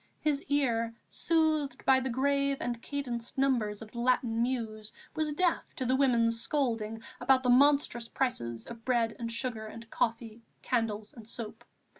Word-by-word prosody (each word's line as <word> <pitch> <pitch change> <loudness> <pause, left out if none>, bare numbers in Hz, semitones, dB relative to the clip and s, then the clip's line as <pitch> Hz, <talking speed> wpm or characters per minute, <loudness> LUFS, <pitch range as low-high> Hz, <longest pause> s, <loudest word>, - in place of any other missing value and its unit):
His 290 -2 +1
ear, 230 -5 +1 0.2
soothed 315 -3 +1
by 265 -1 +6
the 260 0 -2
grave 280 +2 +1
and 240 -1 -3
cadenced 245 -5 -4
numbers 230 -6 +1
of 215 - -13
the 235 - -6
Latin 240 -2 +2
Muse, 225 -4 -2 0.2
was 310 -1 0
deaf 350 +2 0
to 260 - -3
the 255 +2 +2
women's 230 -4 +3
scolding 225 -5 -1 0.2
about 260 -1 +4
the 250 - +4
monstrous 275 -3 +4
prices 120 - -2
of 230 -1 -10
bread 235 -3 +1
and 230 -1 -3
sugar 230 -2 -2
and 230 +1 -10
coffee, 230 -1 -1 0.2
candles 220 -4 -1
and 225 -3 -12
soap. 230 -2 -7
240 Hz, 160 wpm, -30 LUFS, 225-270 Hz, 0.2 s, by